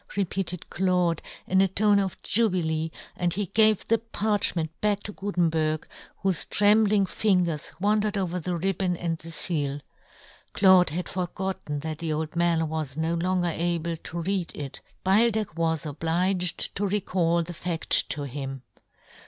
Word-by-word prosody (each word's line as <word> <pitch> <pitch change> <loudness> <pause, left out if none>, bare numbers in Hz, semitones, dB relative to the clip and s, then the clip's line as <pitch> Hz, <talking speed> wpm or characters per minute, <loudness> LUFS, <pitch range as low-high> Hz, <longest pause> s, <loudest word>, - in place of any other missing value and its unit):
repeated 185 -2 -2
Claude, 180 -3 +1 0.2
in 190 +1 +3
a 195 - +4
tone 205 +2 +3
of 195 -2 -2
jubilee, 170 -8 +1 0.3
and 175 -1 0
he 205 +1 -1
gave 215 +1 +3
the 230 0 +3
parch 215 -3 +1
ment 160 -2 -2
back 205 -1 +1
to 205 - -5
Gutenberg, 165 -6 0 0.4
vv^hofe 190 -4 +1
trembling 210 -1 +4
fingers 180 -6 0
w^andered 210 +1 +1
over 180 -2 -1
the 180 +1 -3
ribbon 185 0 0
and 165 -2 -2
the 165 - -9
feal. 145 -4 0 0.7
Claude 185 -3 +6
had 175 +4 -3
forgotten 180 -4 -4
that 155 0 -5
the 165 -2 -1
old 155 +1 -3
man 170 -1 +2
w^as 155 -3 -3
no 160 +1 0
longer 175 0 0
able 170 0 -1
to 170 +1 -6
read 190 -1 -1
it; 140 -2 -6 0.2
Beildech 215 0 +3
w^as 160 -1 -1
obliged 175 +4 0
to 205 +1 0
recall 180 -4 +1
the 175 +2 -7
fad: 170 0 -4
to 145 - +3
him. 135 -1 -6
175 Hz, 155 wpm, -26 LUFS, 160-195 Hz, 0.7 s, Claude